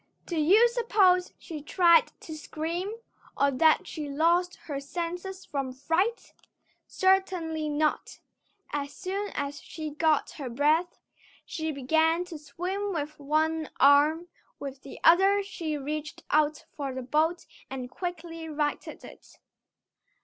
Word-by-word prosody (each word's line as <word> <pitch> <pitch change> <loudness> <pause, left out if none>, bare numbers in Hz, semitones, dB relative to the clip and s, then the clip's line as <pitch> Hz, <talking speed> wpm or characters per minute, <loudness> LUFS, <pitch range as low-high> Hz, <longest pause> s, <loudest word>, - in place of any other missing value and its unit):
Do 345 - -4
you 380 +10 +6
suppose 405 -7 +3
she 315 -4 -8
tried 340 +2 +4
to 315 - -8
scream, 330 +5 -4 0.5
or 280 0 +3
that 310 +4 +4
she 300 -3 -6
lost 340 +5 +2
her 285 -3 -4
senses 355 +6 -5
from 275 -3 -3
fright? 330 - -1 0.5
Certainly 365 -5 +1
not. 300 +1 -1 0.5
As 285 -1 -2
soon 395 +2 -3
as 285 +1 -3
she 310 -2 -6
got 310 0 +1
her 275 -5 -6
breath, 305 +8 +1 0.5
she 315 -1 -3
began 320 +5 +2
to 335 -4 -8
swim 365 +8 -3
with 305 -2 -4
one 310 +2 0
arm; 295 +5 +5 0.3
with 275 -1 -7
the 275 - -10
other 390 +4 +5
she 325 -6 -4
reached 295 +2 -5
out 305 0 +2
for 280 -2 -3
the 260 - -4
boat 315 +7 +1 0.2
and 255 -2 -6
quickly 330 0 -6
righted 295 -1 -3
it. - - -14
315 Hz, 130 wpm, -28 LUFS, 290-355 Hz, 0.5 s, you